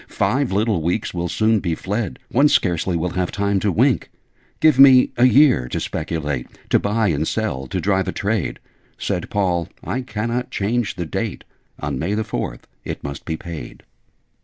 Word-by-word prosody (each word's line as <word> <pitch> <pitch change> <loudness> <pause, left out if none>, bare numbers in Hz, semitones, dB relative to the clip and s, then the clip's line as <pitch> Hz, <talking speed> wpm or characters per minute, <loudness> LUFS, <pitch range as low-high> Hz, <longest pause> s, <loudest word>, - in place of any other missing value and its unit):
Five 135 -2 0
little 105 -2 +1
weeks 90 +6 -1
will 85 0 -2
soon 110 +5 +2
be 85 -4 -1
fled: 100 +2 -3
One 140 +4 +4
scarcely 90 - +1
will 85 +2 -1
have 90 -1 -1
time 100 -1 0
to 100 +1 +1
wink! - - +2 0.5
Give 155 -4 +4
me 130 -2 +8
a 120 - +4
year 130 - +5
to - - -3
speculate 75 -5 -3 0.2
To - - +5
buy 105 0 +1
and 80 0 0
sell 70 -13 -2
to - - -2
drive 95 -1 +1
a - - 0
trade 105 -2 -1 0.2
' - - -37
Said - - -3
Paul 90 -4 0
'I 130 - -2
cannot 115 +1 -3
change 110 +2 -1
the 90 -2 -3
date. 80 - -4 0.4
On 65 - -3
May 95 +8 -1
the 110 - 0
Fourth - - -4 0.2
it - - -6
must 70 0 -6
be 80 -1 -3
paid.' 80 -9 -8
100 Hz, 185 wpm, -21 LUFS, 85-115 Hz, 0.5 s, me